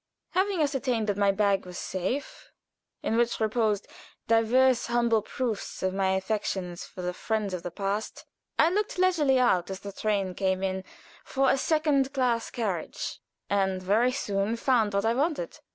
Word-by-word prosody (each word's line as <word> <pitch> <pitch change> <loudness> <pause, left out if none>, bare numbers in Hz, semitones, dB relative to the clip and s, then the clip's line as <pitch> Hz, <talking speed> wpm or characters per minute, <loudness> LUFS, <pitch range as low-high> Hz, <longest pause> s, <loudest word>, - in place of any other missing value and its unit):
Having 375 -2 +1
ascertained 260 -6 0
that 205 -1 0
my 200 0 +3
bag 200 -1 +2
was 180 -1 -9
safe, 255 - -4 0.5
in 225 - 0
which 235 0 +1
reposed 220 -2 +1 0.4
divers 235 +3 +4
humble 235 -2 +2
proofs 225 -3 -4
of 185 0 +1
my 190 -1 +1
affection 190 -2 -2
for 180 +1 -8
the 180 0 -2
friends 215 -1 -2
of 180 - -3
the 175 - -4
past, 200 +4 -3 0.3
I 325 - +5
looked 415 +1 -1
leisurely 335 -8 +3
out 190 -9 +3
as 190 0 -5
the 200 - -6
train 200 -2 -1
came 190 0 0
in 190 0 -1 0.4
for 270 0 +2
a - - +3
second 295 -3 +2
class 245 -3 +1
carriage, 200 -9 -3 0.3
and 190 -2 +1
very 210 +7 +2
soon 205 -4 -1
found 230 -4 +2
what 200 +2 +1
I 225 - +3
wanted. 310 - -1
220 Hz, 165 wpm, -28 LUFS, 195-260 Hz, 0.5 s, I